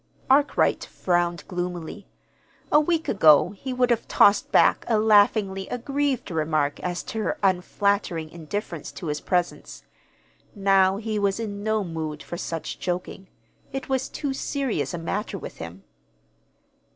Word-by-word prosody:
Arkwright 285 +2 +3
frowned 175 -3 -1
gloomily. 180 +1 -5 0.6
A 300 - +7
week 320 +1 0
ago 160 -2 +5
he 235 +6 -7
would 250 -1 +2
have 230 - 0
tossed 200 +1 +4
back - - +4
a 225 - +2
laughingly 205 -2 +3
aggrieved 275 -1 -2
remark 155 -3 0
as 175 -1 -3
to 220 - -5
her - - -1
unflattering 185 -2 +1
indifference 170 0 -5
to 180 - -8
his 150 -1 -2
presence. 180 -2 -2 0.7
Now 195 -1 +3
he 215 0 -2
was 200 +1 0
in 205 -3 -4
no 215 0 0
mood 160 -3 -5
for - - -6
such 165 -1 -5
joking. 180 +1 -4 0.4
It 270 0 -5
was 265 0 0
too 280 -2 -3
serious 270 -8 -2
a - - -4
matter 195 +5 -3
with - - -9
him. 85 +4 -9
195 Hz, 140 wpm, -25 LUFS, 170-220 Hz, 0.7 s, A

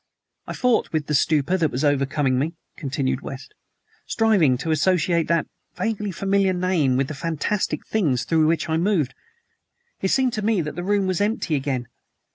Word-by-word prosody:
"I - - -4
fought 250 -3 +1
with 155 -2 -1
the 150 - -3
stupor 155 +4 +2
that 165 -4 +1
was 135 +2 -3
overcoming 135 -2 +1
me," 160 +5 -2 0.2
continued 135 -2 -2
West, 135 -1 -8 0.5
"striving 195 - +3
to 160 +5 -3
associate 170 +1 +2
that 170 0 +1 0.3
vaguely 210 -2 -2
familiar 195 +1 +1
name 175 -8 +1
with 135 0 +1
the 155 - -5
fantastic 165 +7 -2
things 145 - 0
through 155 +3 +2
which 160 -1 +1
I 160 0 0
moved. 170 -6 +1 0.9
It 190 - +1
seemed 255 +4 +2
to 215 - -2
me 215 -1 +1
that 150 -1 -5
the 175 - -4
room 200 +1 +1
was 185 +1 -1
empty 205 -5 0
again. 135 -4 -1
165 Hz, 175 wpm, -23 LUFS, 140-195 Hz, 0.9 s, striving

